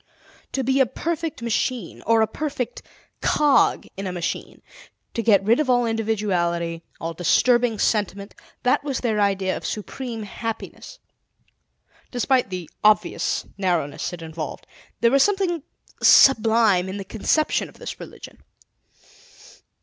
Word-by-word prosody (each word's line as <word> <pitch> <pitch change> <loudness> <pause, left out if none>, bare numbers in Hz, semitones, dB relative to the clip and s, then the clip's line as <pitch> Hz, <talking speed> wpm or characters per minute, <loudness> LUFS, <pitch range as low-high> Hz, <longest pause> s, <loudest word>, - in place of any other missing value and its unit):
To 265 - -1
be 265 +2 +1
a 265 - +4
perfect 325 -2 -4
machine, 235 -3 -2
or 225 0 +5
a - - +1
perfect 265 -5 -4 0.4
cog 295 -2 +3
in 195 0 -5
a - - -3
machine, 175 -2 -5 0.5
to 230 - -1
get 210 -4 +4
rid 225 +6 +3
of 300 -4 0
all 245 -1 +3
individuality, 185 -7 -1 0.2
all 165 0 -4
disturbing 240 +6 +2
sentiment, 200 -1 -1 0.3
that 250 +3 +2
was 280 -3 -3
their 220 -4 0
idea 195 -2 +1
of - - -7
supreme 230 +1 -5
happiness. 225 - -6 1.1
Despite 250 -1 +1
the 180 -3 -5 0.2
obvious 210 -5 +2
narrowness 175 -7 -1
it 175 -2 -8
involved, 160 -2 -6 0.4
there 235 0 +4
was 275 0 +4
something 380 -4 +1 0.4
sublime 220 -7 +5
in 190 - -5
the 195 - -6
conception 300 +10 0
of - - -18
this - - -7
religion. - - -11
225 Hz, 135 wpm, -23 LUFS, 190-255 Hz, 1.1 s, or